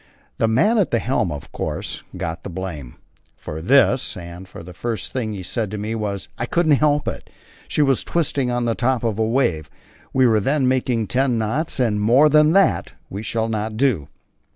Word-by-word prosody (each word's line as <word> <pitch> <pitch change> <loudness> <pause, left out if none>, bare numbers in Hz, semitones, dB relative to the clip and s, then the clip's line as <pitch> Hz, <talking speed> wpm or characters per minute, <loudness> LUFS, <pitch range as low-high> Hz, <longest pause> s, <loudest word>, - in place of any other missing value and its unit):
The 115 - +3
man 210 - +3
at 195 - +2
the 115 - +1
helm, 115 -7 0
of 75 -1 -7
course, - - -4 0.2
got 80 0 -4
the - - -7
blame 85 -9 -6 0.4
for 80 +1 -7
this, 130 +4 +3
and 85 +1 -9
the 90 -1 -10
first 115 +3 -4
thing 115 -5 -2
he 95 -2 -6
said 100 +4 -2
to 105 - -5
me 105 +2 -3
was 105 -3 -3
"I 120 - -2
couldn't 170 +1 +2
help 150 -1 +2
it, - - -5 0.4
she 150 - +1
was 135 -3 +2
twisting 145 -6 0
on 120 0 -1
the 115 - +1
top 125 0 0
of 110 -2 -1
a - - +3
wave." 100 - 0 0.4
We 130 -1 +3
were 110 -3 +4
then 135 +5 +1
making 125 -3 +1
ten 125 +2 +1
knots, 130 +9 -1
and 110 -5 +1
more 125 +8 +5
than 150 +1 +5
that 195 +1 +2 0.2
we 100 - -5
shall 110 +1 -1
not 110 0 -3
do. 115 - +1
115 Hz, 200 wpm, -21 LUFS, 100-130 Hz, 0.4 s, more